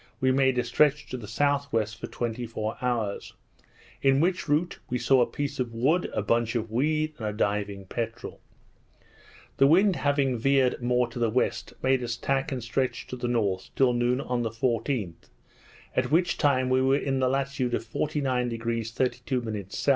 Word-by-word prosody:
we 130 0 +3
made 130 -1 +3
a 125 - +2
stretch 150 +5 +2
to - - -6
the 120 -4 -7
S.W. 140 0 +1
for 110 +1 -8
twenty 120 0 -3
four 110 0 -3
hours; 115 -5 -2 0.7
in 135 0 +4
which 175 0 0
route 155 +4 +1
we 125 - 0
saw 130 +1 +4
a 120 - +3
piece 145 -1 -4
of 120 -2 -2
wood, 150 +10 +2
a - - -2
bunch 115 +2 +1
of 115 -1 -2
weed, 155 +5 +1
and 110 - -3
a - - -1
diving 100 -1 -2
peterel. 115 +3 -5 1.2
The 135 - +6
wind 185 +5 +4
having 140 -4 +1
veered 135 0 +2
more 125 0 +2
to 115 - -7
the 115 -1 +2
west, 125 +4 -1
made 130 0 +3
us 115 -1 -3
tack 135 +2 -1
and 130 -3 -3
stretch 120 +1 -1
to - - -4
the 120 -1 -3
north 100 -6 0
till 130 -2 +4
noon 120 +1 +1
on 125 -3 -2
the 115 - -1
14th, 115 - -2 0.7
at 130 -1 +1
which 175 +4 +2
time 130 -3 +2
we 130 0 +4
were 135 +1 +3
in 135 -2 -1
the 130 -1 +2
latitude 135 -2 -1
of - - -4
49° 120 -4 -1
32' 120 -4 -2
S. 140 - -2
125 Hz, 185 wpm, -27 LUFS, 115-135 Hz, 1.2 s, The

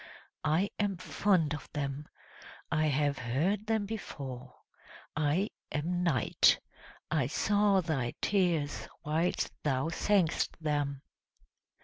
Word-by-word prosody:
I 160 +6 +2
am 200 -3 0
fond 180 -4 +1
of 150 - -7
them. 140 0 -3 0.6
I 155 -1 +2
have 145 -1 +1
heard 170 - 0
them 220 -2 +1
before; 135 - -6 0.6
I 155 +7 +1 0.2
am 175 +4 -1
Night; 155 -10 +4 0.5
I - - +2
saw 205 -1 +3
thy 140 -8 -1
tears 175 -7 +1 0.2
whilst 160 +4 0
thou 135 +1 +1
sang'st 180 0 +1
them!" 145 -3 -1
155 Hz, 105 wpm, -31 LUFS, 145-190 Hz, 0.6 s, Night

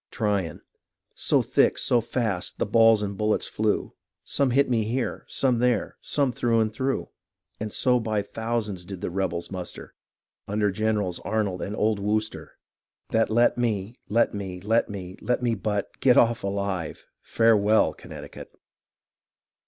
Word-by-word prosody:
Tryon 100 -7 -1 0.5
So - - +2
thick, - - +3
so 120 - +3
fast, 110 -6 -2
the - - 0
balls 115 0 +5
and 100 -1 -3
bullets 105 +2 +1
flew, 110 -1 -1 0.3
Some 140 -2 +1
hit 135 +3 +3
me 115 -3 +1
here, 120 +3 -2
some 125 -3 +1
there, 125 -3 +1
some 140 -3 +1
thro' 115 -1 +1
and 110 -1 +1
thro'; 130 +4 -2 0.5
And 110 0 -4
so 125 +2 +2
by 110 -3 -1
thousands 110 -3 -3
did 90 0 -8
the - - -3
rebels 90 -2 -2
muster 90 -2 -7 0.5
Under 105 0 +1
Generals 105 -3 -1
Arnold 100 -4 -1
and 105 - -4
old 105 -1 +1
Wooster 110 +2 -2 0.5
That 115 0 +2
let 120 +2 +3
me, 110 -3 -1 0.2
let 115 +3 +2
me, 95 -3 -5
let 110 +6 +1
me, 95 -3 -7
let 125 0 0
me 120 -1 +2
but 105 -1 -2
Get 125 -2 +5
off 120 0 +4
alive 100 -4 -3
— - - -55
Farewell^ 110 -2 +4
Connecticut. - - -10
110 Hz, 155 wpm, -25 LUFS, 100-115 Hz, 0.5 s, balls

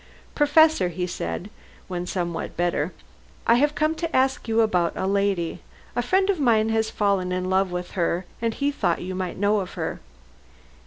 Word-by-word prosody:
"Professor," 295 - +4
he 180 +1 -3
said, 180 +2 -4 0.4
when 180 -1 -4
somewhat 175 -3 -3
better, 175 -1 0 0.5
"I 230 - +5
have 290 +3 +2
come 310 +1 +2
to 330 +1 -4
ask 265 0 +1
you 225 0 +3
about 180 -6 +2
a - - -2
lady. 195 -3 0 0.3
A - - +2
friend 380 +1 +2
of 370 - -3
mine 225 -5 +3
has 220 0 +1
fallen 200 -3 0
in 185 0 -1
love 190 0 +2
with 180 0 -4
her, 175 0 -1 0.2
and 230 -1 +1
he 285 0 0
thought 175 -12 0
you 185 +1 -4
might 185 -1 -4
know 205 +1 +2
of 185 - -5
her." - - -4
200 Hz, 180 wpm, -24 LUFS, 180-245 Hz, 0.5 s, I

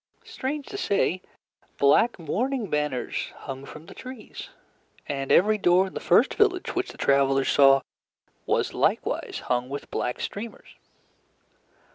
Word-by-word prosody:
Strange 295 - -4
to 400 - -7
say, 185 - +1 0.6
black 145 +12 +4
mourning 220 - -2
banners 150 -4 -1
hung 135 0 -8
from 155 +2 -11
the - - -12
trees, 255 -4 -9 0.6
and 135 -1 -3
every 210 +3 +4
door 180 0 +4
in 190 - -9
the - - -4
first 225 +10 +3
village 395 -4 +1
which 370 +1 -2
the - - -15
travelers 135 -1 +2
saw 135 -1 +6 0.7
was - - 0
likewise - - -1
hung 125 0 -1
with 140 +1 -7
black 125 - -2
streamers. 220 +3 -7
175 Hz, 135 wpm, -25 LUFS, -, 0.7 s, saw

